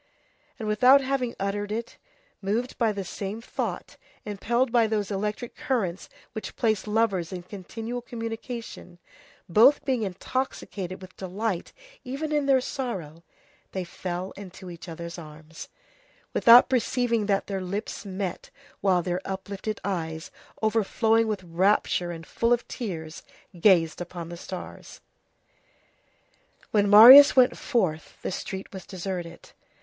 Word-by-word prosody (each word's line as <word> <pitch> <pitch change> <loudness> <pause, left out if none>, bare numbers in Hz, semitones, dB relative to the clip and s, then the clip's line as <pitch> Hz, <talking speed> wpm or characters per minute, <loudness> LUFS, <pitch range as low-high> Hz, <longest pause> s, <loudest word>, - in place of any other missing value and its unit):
And 220 -4 -5
without 250 +6 +6
having 260 -3 -2
uttered 205 +1 -2
it, 230 +2 -4 0.4
moved 225 +6 -2
by 230 -3 +3
the 200 -2 -4
same 195 +4 -5
thought, 230 - -5 0.3
impelled 235 +5 0
by 235 -2 +4
those 210 -2 -1
electric 210 +4 -3
currents 200 -9 -2 0.2
which 220 - -6
place 220 -4 0
lovers 210 -6 0
in 180 -2 -6
continual 225 +6 -6
communication, 230 -5 -7 0.5
both 230 - +5
being 260 -4 0
intoxicated 190 -2 -4
with 185 - -13
delight 190 0 -3 0.3
even 275 +4 -4
in 295 -2 +1
their 265 -2 +4
sorrow, 185 - -5 0.5
they 190 - -2
fell 180 +1 -5
into 185 -2 -10
each 170 +1 -10
other's 170 +1 -7
arms, 155 0 -11 0.6
without 235 +1 +8
perceiving 245 -3 0
that 200 -1 +1
their 195 -2 -3
lips 195 +4 -4
met 190 -2 -5 0.3
while 185 -3 +2
their 180 +1 -2
uplifted 200 +2 -5
eyes, 160 -5 -4 0.3
overflowing 225 +1 +2
with 210 -4 -3
rapture 180 0 +1
and 165 -1 -7
full 230 +1 -1
of 240 -1 +2
tears, 165 -9 -6 0.4
gazed 170 -4 +4
upon 175 -1 -7
the 175 - -7
stars. 185 +1 -9 1.7
When 205 -2 +3
Marius 250 +8 +11
went 255 -1 +5
forth, 185 - -1
the - - -2
street 190 +1 -6
was 190 -1 -9
deserted. 180 -3 -6
205 Hz, 130 wpm, -26 LUFS, 180-230 Hz, 1.7 s, Marius